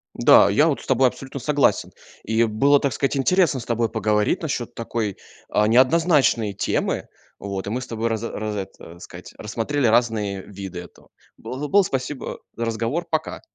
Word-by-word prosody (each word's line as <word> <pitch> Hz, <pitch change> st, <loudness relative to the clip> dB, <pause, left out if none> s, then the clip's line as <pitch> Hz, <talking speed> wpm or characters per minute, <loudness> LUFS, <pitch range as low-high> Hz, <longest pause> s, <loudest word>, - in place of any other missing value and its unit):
Да, -, -, +6 dB
я 145 Hz, +11 st, +4 dB
вот, 150 Hz, -, -1 dB
с -, -, -13 dB
тобой 130 Hz, 0 st, +4 dB
абсолютно 135 Hz, +2 st, -6 dB
согласен. 145 Hz, +1 st, +1 dB, 0.3 s
И 110 Hz, +2 st, +1 dB
было, 140 Hz, +7 st, +3 dB
так 140 Hz, -3 st, -1 dB
сказать, 135 Hz, +4 st, -1 dB
интересно 160 Hz, 0 st, +2 dB
с 115 Hz, -, -8 dB
тобой 115 Hz, -1 st, 0 dB
поговорить 105 Hz, -, 0 dB
насчёт 130 Hz, -6 st, -3 dB
такой, 115 Hz, -3 st, -3 dB, 0.4 s
э, 105 Hz, 0 st, +3 dB
неоднозначной 130 Hz, -, +3 dB
темы, 100 Hz, -, -1 dB, 0.4 s
вот. 100 Hz, -1 st, -5 dB
И -, -, -2 dB
мы 115 Hz, -, -2 dB
с 125 Hz, -, -8 dB
тобой 115 Hz, 0 st, -2 dB
раз 115 Hz, -1 st, -2 dB
раз 110 Hz, -2 st, -4 dB
это, 95 Hz, -2 st, -6 dB, 0.2 s
так 85 Hz, -, -16 dB
сказать, 90 Hz, 0 st, -11 dB
рассмотрели 120 Hz, +6 st, -2 dB
разные 110 Hz, -4 st, +1 dB
виды 95 Hz, -2 st, -8 dB
этого. 90 Hz, -, -16 dB, 0.3 s
Было 135 Hz, +4 st, -6 dB
было, 200 Hz, +5 st, +4 dB
спасибо 135 Hz, -3 st, -4 dB, 0.2 s
за 115 Hz, -, -3 dB
разговор. 115 Hz, +9 st, -2 dB
Пока. 155 Hz, 0 st, -2 dB
115 Hz, 175 wpm, -22 LUFS, 105-140 Hz, 0.4 s, Да